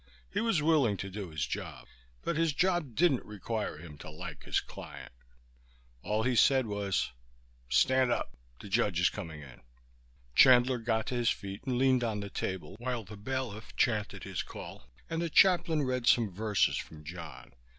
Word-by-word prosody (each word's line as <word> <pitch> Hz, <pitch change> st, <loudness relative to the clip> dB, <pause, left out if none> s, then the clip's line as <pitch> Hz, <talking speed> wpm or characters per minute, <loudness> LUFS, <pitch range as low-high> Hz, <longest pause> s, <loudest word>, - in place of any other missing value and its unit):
He -, -, +1 dB
was 225 Hz, -10 st, +1 dB
willing 145 Hz, -10 st, +3 dB
to 95 Hz, +1 st, -5 dB
do 100 Hz, -2 st, -5 dB
his 75 Hz, -2 st, -2 dB
job, -, -, -6 dB, 0.4 s
but 170 Hz, -, -1 dB
his 165 Hz, -1 st, +2 dB
job 175 Hz, -7 st, +1 dB
didn't 145 Hz, -6 st, +3 dB
require 105 Hz, -2 st, -4 dB
him 75 Hz, -2 st, -11 dB
to -, -, -9 dB
like 75 Hz, -, -8 dB
his -, -, +1 dB
client. -, -, -10 dB, 0.9 s
All 110 Hz, -, 0 dB
he 125 Hz, +1 st, +1 dB
said 130 Hz, +2 st, +5 dB
was, 100 Hz, -, -1 dB, 0.6 s
"Stand 130 Hz, -, +4 dB
up. -, -, -2 dB, 0.2 s
The -, -, -9 dB
judge 100 Hz, -3 st, +1 dB
is 90 Hz, -, +4 dB
coming 80 Hz, -7 st, -7 dB
in." 65 Hz, -3 st, -13 dB, 0.7 s
Chandler 125 Hz, -, +6 dB
got 110 Hz, -1 st, 0 dB
to -, -, -1 dB
his 120 Hz, -1 st, +2 dB
feet 100 Hz, 0 st, -4 dB
and 125 Hz, -2 st, 0 dB
leaned 130 Hz, -1 st, +3 dB
on 110 Hz, -3 st, -1 dB
the 100 Hz, -1 st, -6 dB
table 95 Hz, +1 st, -4 dB
while 120 Hz, -1 st, -2 dB
the 105 Hz, +2 st, -10 dB
bailiff 110 Hz, -1 st, -5 dB
chanted 105 Hz, -4 st, 0 dB
his 95 Hz, -2 st, -3 dB
call 65 Hz, -, -10 dB, 0.2 s
and 165 Hz, 0 st, -2 dB
the 170 Hz, -, -1 dB
chaplain 175 Hz, -3 st, +4 dB
read 125 Hz, -2 st, -1 dB
some 115 Hz, -5 st, +4 dB
verses 105 Hz, +1 st, +1 dB
from 75 Hz, -1 st, -8 dB
John. 85 Hz, +2 st, -9 dB
110 Hz, 175 wpm, -31 LUFS, 95-130 Hz, 0.9 s, Chandler